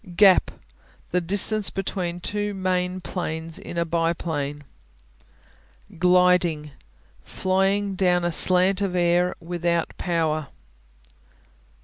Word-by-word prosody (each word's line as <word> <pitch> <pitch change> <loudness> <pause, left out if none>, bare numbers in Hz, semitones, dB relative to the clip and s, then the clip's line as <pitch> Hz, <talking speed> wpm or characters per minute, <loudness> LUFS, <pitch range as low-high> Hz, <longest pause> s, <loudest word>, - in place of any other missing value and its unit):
Gap 195 -1 +5 0.6
The 180 - +1
distance 200 +4 +1
between 180 -3 -4
two 205 +2 -2
main 185 -1 -1
planes 165 -3 -4
in 170 - -8
a 170 - +1
biplane. 160 -3 -2 1.4
Gliding 180 -4 +3 0.5
Flying 195 +2 0
down 180 -2 +1
a 175 - 0
slant 185 +3 +3
of 190 -2 -1
air 175 0 +2
without 170 0 -2
power. 160 -4 -1
180 Hz, 95 wpm, -24 LUFS, 170-185 Hz, 1.4 s, Gap